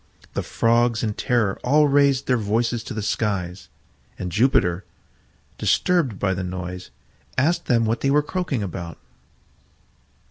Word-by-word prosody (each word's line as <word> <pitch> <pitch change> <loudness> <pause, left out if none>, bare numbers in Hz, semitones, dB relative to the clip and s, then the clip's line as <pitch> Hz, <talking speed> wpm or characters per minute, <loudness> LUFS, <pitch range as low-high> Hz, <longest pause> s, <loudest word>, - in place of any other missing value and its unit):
The - - -1
Frogs 115 0 +1
in 110 -2 0
terror 115 -5 0
all 150 +4 +4
raised 140 -1 +3
their 125 - +2
voices 115 +1 0
to 120 - -6
the 110 - -3
skies, 95 -5 -2 0.5
and 90 -1 -4
Jupiter, 100 -6 +2 0.8
disturbed 165 - +1
by 95 -1 0
the 95 0 -3
noise, 90 0 -6 0.5
asked 155 +7 +1
them 115 -2 +3
what 115 +2 -1
they 135 - +1
were 145 +1 +3
croaking 155 - -2
about. 85 -4 -6
115 Hz, 140 wpm, -23 LUFS, 95-135 Hz, 0.8 s, all